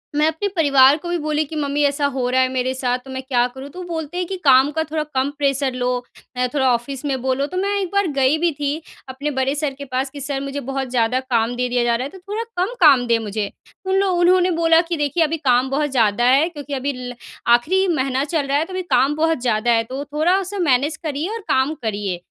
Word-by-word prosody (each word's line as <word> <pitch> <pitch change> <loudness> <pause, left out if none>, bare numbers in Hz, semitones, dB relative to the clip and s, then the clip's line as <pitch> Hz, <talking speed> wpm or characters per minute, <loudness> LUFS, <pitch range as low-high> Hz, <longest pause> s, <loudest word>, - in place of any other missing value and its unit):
मैं 300 +1 +3
अपने 320 +6 -1
परिवार 280 -3 +5
को 345 +2 -7
भी 350 - 0
बोली 305 -1 -1
कि 315 - -9
मम्मी 290 -1 -1
ऐसा 285 0 +1
हो 250 -2 -1
रहा 260 +1 +2
है 260 - +3
मेरे 255 0 0
साथ, 250 -1 -1
तो 265 - -9
मैं 260 0 -4
क्या 250 -2 +1
करूँ? 265 +3 -10
तो 360 - -11
वो - - -7
बोलते 325 0 -5
हैं 360 - -1
कि 385 - -4
काम 270 +1 +6
का 320 +1 -1
थोड़ा 310 0 -3
कम 260 +1 +1
प्रेशर 275 -2 0
लो। 250 0 -1 0.5
अ, 250 0 +1
थोड़ा 265 -3 +2
ऑफ़िस 250 +3 -4
में 265 -3 -1
बोलो, 265 +1 0
तो 365 - -6
मैं 400 +2 0
एक 380 - -2
बार 400 -1 +2
गई 270 +3 +3
भी 340 +1 +1
थी, 290 +2 -3 0.3
अपने 280 +3 -3
बड़े 265 +1 +1
सर 290 -2 -1
के 280 - -7
पास 260 +1 -2
कि 285 +1 -9
सर 275 0 -3
मुझे 275 0 -4
बहुत 270 -1 -3
ज़्यादा 245 +1 +1
काम 245 -2 0
दे 250 0 -1
दिया 245 0 +1
जा 235 0 +2
रहा 240 - -2
है, - - -5
तो 380 - -13
थोड़ा 430 +3 -3 0.2
कम 445 - -3
काम 275 -6 +6
दें 235 -1 +3
मुझे। 210 -1 -3 0.3
उन 380 - 0
लो 395 - +2
उन्होंने 360 +1 +3
बोला 330 -1 +4
कि 340 - -1
देखिए 295 +3 +1
अभी 320 +1 -1
काम 260 -3 +2
बहुत 295 +2 0
ज़्यादा 230 -2 +2
है, 275 +6 +4
क्योंकि 290 -4 -8
अभी 275 +1 -2
ल 245 -1 -6 0.4
आखिरी 365 +11 +3
महीना 265 -1 0
चल 295 -1 -1
रहा 280 +1 +1
है, 310 - 0
तो 370 - -10
अभी 370 - -2
काम 280 -4 +2
बहुत 320 -1 +1
ज़्यादा 235 -1 +1
है, 225 -1 +3
तो 260 +5 -6
थोड़ा 320 +5 +2
उसे 390 +1 -5
मैनेज 295 -2 +2
करिए 305 +3 -3
और 460 - -4
काम 265 +3 +2
करिए। 205 -4 -2
280 Hz, 260 wpm, -20 LUFS, 255-320 Hz, 0.5 s, काम